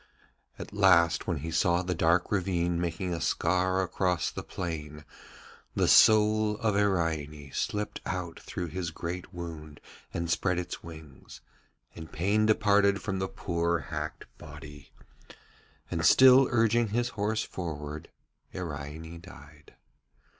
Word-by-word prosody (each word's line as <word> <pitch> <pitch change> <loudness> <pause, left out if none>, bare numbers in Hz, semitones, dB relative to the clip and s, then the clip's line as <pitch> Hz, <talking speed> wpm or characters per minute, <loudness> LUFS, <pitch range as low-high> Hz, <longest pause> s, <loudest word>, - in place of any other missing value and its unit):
At - - -9
last 90 -5 +4
when 85 -4 -1
he 80 +2 -5
saw 85 +1 +2
the 90 0 -2
dark 85 +1 +2
ravine 85 -3 0
making 90 +1 -2
a 85 - -4
scar 95 +1 +1
across 90 -2 -1
the - - -6
plain, 75 -4 -6 0.7
the - - +2
soul 110 0 +5
of 110 -2 0
Iraine 80 -8 -1
slipped 105 0 -3
out 90 -2 -4
through 90 -2 -5
his 90 +1 -4
great 85 +2 -6
wound 80 -3 -8 0.3
and 85 0 -3
spread 90 +1 0
its 90 - -5
wings, 80 -4 -12 0.5
and 80 -1 -10
pain 105 +5 +1
departed 100 -2 +3
from 95 -2 -3
the 95 - -1
poor 85 -2 -1
hacked 75 -1 -6
body, 75 -2 -12 1.0
and, 80 - -2
still 130 - +7
urging 115 0 +2
his 120 +3 -1
horse 110 +1 -1
forward, 75 -4 -6 0.5
Iraine 80 0 -6
died. 75 +1 -15
85 Hz, 130 wpm, -28 LUFS, 80-100 Hz, 1.0 s, still